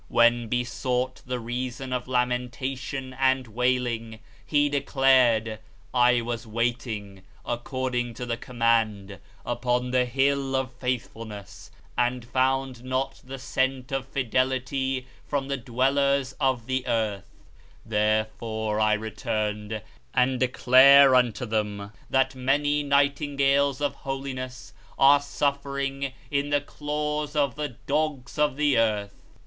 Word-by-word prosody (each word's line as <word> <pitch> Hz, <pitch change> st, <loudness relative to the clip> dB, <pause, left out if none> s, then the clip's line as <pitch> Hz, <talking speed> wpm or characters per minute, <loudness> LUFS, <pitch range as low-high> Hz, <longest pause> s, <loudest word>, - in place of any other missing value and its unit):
When 120 Hz, 0 st, +3 dB
besought 125 Hz, +2 st, -1 dB
the 125 Hz, -1 st, -2 dB
reason 125 Hz, +2 st, -4 dB
of 125 Hz, 0 st, -3 dB
lamentation 130 Hz, +1 st, -2 dB
and 130 Hz, -1 st, +3 dB
wailing, 120 Hz, -1 st, -1 dB, 0.3 s
He 145 Hz, -1 st, +2 dB
declared, 130 Hz, -6 st, +3 dB, 0.3 s
"I 125 Hz, -1 st, +4 dB
was 115 Hz, 0 st, -4 dB
waiting, 110 Hz, -4 st, -3 dB, 0.2 s
according 120 Hz, 0 st, -2 dB
to 125 Hz, -, -5 dB
the 120 Hz, -1 st, -1 dB
Command, 115 Hz, -5 st, 0 dB, 0.3 s
upon 125 Hz, +1 st, -1 dB
the 125 Hz, 0 st, +3 dB
Hill 135 Hz, +1 st, +1 dB
of 130 Hz, -1 st, -1 dB
Faithfulness, 115 Hz, -5 st, -5 dB, 0.3 s
and 120 Hz, 0 st, 0 dB
found 130 Hz, 0 st, 0 dB
not 130 Hz, +1 st, -2 dB
the 135 Hz, +1 st, -7 dB
scent 130 Hz, 0 st, -1 dB
of 135 Hz, -1 st, -2 dB
fidelity 130 Hz, +1 st, -1 dB, 0.2 s
from 140 Hz, -1 st, -2 dB
the 140 Hz, -, -1 dB
dwellers 135 Hz, +2 st, +1 dB
of 130 Hz, -5 st, +1 dB
the 130 Hz, 0 st, -2 dB
earth; 110 Hz, -4 st, -1 dB, 0.6 s
therefore 110 Hz, 0 st, 0 dB
I 110 Hz, 0 st, +3 dB
returned, 105 Hz, 0 st, -3 dB, 0.3 s
and 125 Hz, 0 st, +2 dB
declare 130 Hz, +2 st, +7 dB
unto 125 Hz, -1 st, +2 dB
them 105 Hz, -2 st, -2 dB, 0.2 s
that 135 Hz, 0 st, +2 dB
many 145 Hz, +3 st, +1 dB
nightingales 140 Hz, -1 st, +2 dB
of 145 Hz, -, 0 dB
holiness 130 Hz, -2 st, -6 dB, 0.2 s
are 140 Hz, +1 st, +7 dB
suffering 140 Hz, -1 st, -2 dB, 0.2 s
in 140 Hz, 0 st, 0 dB
the 145 Hz, 0 st, +3 dB
claws 150 Hz, +1 st, -3 dB
of 140 Hz, -4 st, +2 dB
the 145 Hz, -3 st, -5 dB
dogs 145 Hz, -2 st, -1 dB
of 150 Hz, -2 st, +2 dB
the 145 Hz, -4 st, +3 dB
earth." 105 Hz, -3 st, 0 dB
130 Hz, 120 wpm, -26 LUFS, 115-135 Hz, 0.6 s, declare